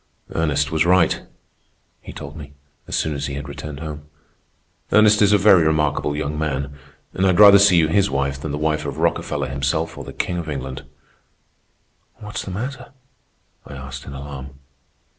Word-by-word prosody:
"Ernest 75 -2 0
was 80 -1 +2
right," 90 -1 +3 0.8
he - - -10
told 75 -1 -9
me, 70 -2 -10 0.3
as - - -3
soon 80 - 0
as 70 0 -3
he 70 - -5
had 70 +1 -6
returned 70 0 -8
home. 75 -2 -7 0.8
"Ernest 105 0 +5
is 105 -1 +5
a 105 - +6
very 100 -2 +6
remarkable 75 -2 0
young 75 0 -3
man, 70 -2 -2 0.4
and 95 - -2
I'd 90 0 +2
rather 100 -1 +9
see 100 -3 +5
you 80 -2 +4
his 100 +5 +2
wife 70 0 -2
than 75 - -4
the 75 - -3
wife 75 0 0
of 70 +1 -5
Rockefeller 85 +1 -1
himself 70 +4 -1
or - - -6
the - - -9
King 90 -1 -3
of 80 -2 -6
England." 65 -2 -5 1.3
"What's 105 0 -6
the - - -7
matter?" 125 +9 -6 0.7
I 70 - -9
asked 70 +1 -8
in 70 - -7
alarm. 70 -1 -8
75 Hz, 180 wpm, -21 LUFS, 70-85 Hz, 1.3 s, rather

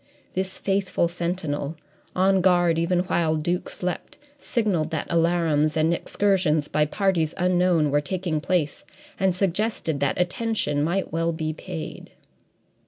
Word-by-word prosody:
This 190 0 -2
faithful 195 -3 0
sentinel, 170 -4 -3 0.4
on 190 +1 +3
guard 175 -2 +3
even 175 +1 +2
while 170 -3 +1
Duke 175 +4 -1
slept, 180 -2 -5 0.2
signalled 210 - 0
that 160 - -3
alarums 165 -3 +2
and 160 +2 +3
excursions 175 -5 +1
by 150 0 +2
parties 170 -3 0
unknown 180 -4 +2
were 145 +1 +3
taking 170 -1 -2
place, 165 -4 -1 0.4
and 190 -2 +2
suggested 185 -4 -1
that 140 +3 0
attention 180 -5 0
might 175 +2 -1
well 165 0 +1
be 160 -1 -3
paid. 160 -1 -7
170 Hz, 130 wpm, -24 LUFS, 155-185 Hz, 0.4 s, on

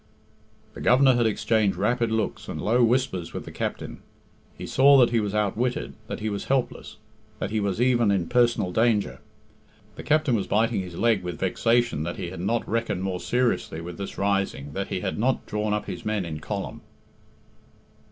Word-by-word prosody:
The - - -9
Governor 130 +2 +5
had 120 -2 +2
exchanged 110 -2 +1
rapid 115 +3 +1
looks 110 0 -2
and - - -5
low 120 +3 +2
whispers 115 -8 0
with - - -5
the - - -8
captain. - - -4 0.6
He - - -6
saw 140 +1 +6
that 120 -3 +5
he 115 - +2
was 105 -1 -2
outwitted, 115 +6 -1
that - - -5
he 110 - -2
was 100 -2 -3
helpless, 135 -2 -2 0.4
that 105 - -4
he 110 - 0
was 100 -1 -1
even 120 -3 +3
in 95 -4 +1
personal 120 -6 +2
danger. 110 0 +1 0.8
The - - -6
captain 155 -4 +2
was 100 - -1
biting 110 -1 +1
his 90 -2 -8
leg 115 0 +2
with 90 -2 -5
vexation 115 0 +1
that 85 +2 -4
he 90 -2 -5
had 95 - -7
not 115 +5 -1
reckoned 115 -5 -1
more 95 -2 -2
seriously 120 -10 0
with 85 +1 -8
this 100 - -6
rising 95 -8 -1
that 95 +3 -3
he 90 - -3
had - - -3
not 130 +3 0
drawn 105 0 -2
up 105 0 -1
his - - -6
men 105 -3 -1
in 80 -2 -5
column. 100 +5 -5
105 Hz, 190 wpm, -25 LUFS, 95-120 Hz, 0.8 s, saw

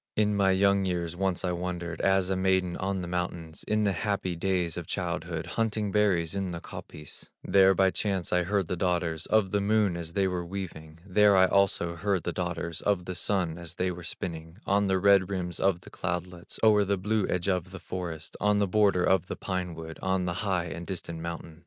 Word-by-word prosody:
In 105 -1 +2
my 100 -1 +3
young 100 +1 +3
years 85 -2 -2
once 95 0 0
I 90 - +1
wandered, 85 -1 -4
As 95 -1 +2
a - - +2
maiden 95 -1 +1
on 95 0 -2
the 90 - -5
mountains, 85 -2 -3
In 105 0 +2
the 100 - +3
happy 95 -1 -1
days 90 -1 0
of 85 -3 -5
childhood, 85 -2 -3
Hunting 110 -2 -1
berries 95 -5 +2
in 95 -1 -2
the 85 -1 -4
coppice; 75 -2 -9
There 95 -1 +5
by 95 0 +4
chance 95 -4 -1
I 90 - +4
heard 95 0 0
the 90 - -1
daughters 85 -3 -1
Of 110 -4 +2
the 100 - +1
Moon 105 -2 +2
as 85 -1 -6
they 95 0 +2
were 90 -1 -2
weaving; 85 -3 -7
There 100 +1 +5
I 95 - +7
also 95 -3 +2
heard 95 0 0
the 85 - -2
daughters 85 -2 -3
Of 100 -4 +1
the 95 - -4
Sun 90 -3 0
as 85 0 -6
they 90 +1 0
were 90 0 -7
spinning 80 0 -6
On 100 +1 +2
the 95 0 +2
red 100 -1 +5
rims 90 -3 -3
of 95 -3 +2
the - - -14
cloudlets, 90 -1 -4
O'er 105 -2 +6
the 100 0 0
blue 105 +2 0
edge 90 +1 -1
of 90 -2 0
the 95 0 -9
forest, 85 -4 -6
On 105 0 +3
the 100 - +3
border 100 -2 +3
of 95 -1 +3
the - - -4
pine 90 -3 -3
wood, 80 0 -8
On 95 -1 0
a 90 - 0
high 90 -2 -1
and 85 0 -6
distant 85 -3 -5
mountain. 85 -1 -6
90 Hz, 215 wpm, -28 LUFS, 85-100 Hz, -, I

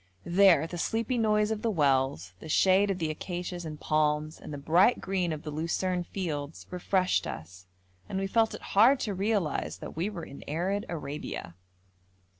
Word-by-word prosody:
There 175 -3 +5
the 175 +1 -6
sleepy 230 +6 0
noise 210 -1 +2
of 215 -1 -2
the 230 - 0
wells, 135 - +1
the 160 - -10
shade 190 +5 +4
of 195 - 0
the 160 -3 -1
acacias 175 +2 -5
and 155 -1 -6
palms, 155 0 0
and - - -9
the 145 - -5
bright 170 +11 +4
green 185 -3 -1
of 155 -1 -5
the 150 - -5
lucerne 175 +3 -1
fields, 155 -6 -4
refreshed 185 +1 +1
us, 90 +4 -8 0.4
and 190 - -3
we 195 - 0
felt 225 +3 +2
it - - -11
hard 240 +7 +6
to 210 - -1
realise 190 - -1
that - - -8
we 170 +6 -1
were 175 -6 -6
in 140 - -11
arid 185 +7 -1
Arabia. 145 - -5
175 Hz, 180 wpm, -29 LUFS, 150-195 Hz, 0.4 s, hard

